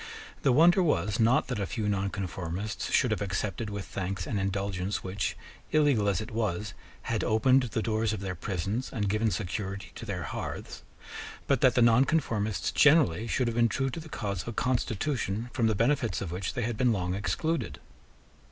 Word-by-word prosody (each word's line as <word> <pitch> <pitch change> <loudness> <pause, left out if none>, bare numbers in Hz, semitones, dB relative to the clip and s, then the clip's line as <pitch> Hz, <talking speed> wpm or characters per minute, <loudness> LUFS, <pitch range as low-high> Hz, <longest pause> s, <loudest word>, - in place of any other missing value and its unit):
The 135 - +3
wonder 170 +8 +6
was, 105 - +1
not 115 +3 +4
that 125 -4 -3
a 100 - -1
few 110 -3 -2
nonconformists 95 -1 -3
should - - +3
have - - -1
accepted 100 +2 -2
with 100 -1 -5
thanks 95 -1 -4
an 105 - -2
indulgence 95 0 -2
which, 95 -1 -2 0.3
illegal 140 -9 +3
as 95 -3 +1
it 110 +3 -6
was, 105 -3 -2 0.3
had 110 -2 -1
opened 130 +5 +4
the 115 -2 -2
doors 110 -1 0
of 110 - -3
their 95 -1 -3
prisons 100 +6 -3
and 105 -5 -1
given 110 +3 +1
security 100 -3 -4
to 115 - -9
their 90 -4 -3
hearths, - - -6 0.6
but - - +1
that - - +5
the 120 - +5
nonconformists 115 - +2
generally 150 - +4
should 125 +2 0
have 115 - -2
been 115 -1 +4
true 135 +2 -1
to 165 - -5
the 160 0 -10
cause 100 - -3
of - - -12
a 120 - -3
constitution 120 -2 -1
from 115 -3 +2
the 110 - +1
benefits 120 +2 +1
of 95 -4 -4
which 90 +1 -3
they 125 - -1
had 115 -1 -2
been 125 -1 +3
long 90 -4 -1
excluded. 160 - -2
110 Hz, 190 wpm, -29 LUFS, 95-120 Hz, 0.6 s, wonder